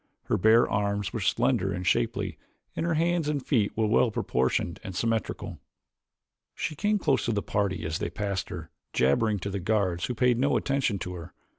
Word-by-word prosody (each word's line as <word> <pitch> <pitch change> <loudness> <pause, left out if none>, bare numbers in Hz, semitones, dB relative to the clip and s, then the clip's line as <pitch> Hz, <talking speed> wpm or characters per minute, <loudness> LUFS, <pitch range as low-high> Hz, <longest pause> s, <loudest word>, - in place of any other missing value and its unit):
Her - - 0
bare 110 +4 +5
arms 100 0 -1
were 115 - -2
slender 115 -1 +1
and 90 0 -4
shapely - - 0 0.4
and 165 - -1
her 165 - +1
hands 165 -1 +1
and 145 -3 -2
feet 110 -8 +2
well 110 +2 +3
proportioned 70 - 0
and 95 - -7
symmetrical. 115 +1 -2 1.0
She - - -3
came 210 +7 +1
close 140 -8 +1
to 120 - +1
the 100 - -1
party 95 -5 -1
as 80 -1 -2
they - - -2
passed 100 +1 -3
her, - - -7 0.2
jabbering 105 - +2
to 100 - -3
the 100 - -2
guards 95 -3 0
who 125 - -3
paid 125 0 +3
no 140 +2 +3
attention 135 -7 0
to 90 0 -5
her. 85 -2 -9
105 Hz, 185 wpm, -27 LUFS, 95-125 Hz, 1.0 s, bare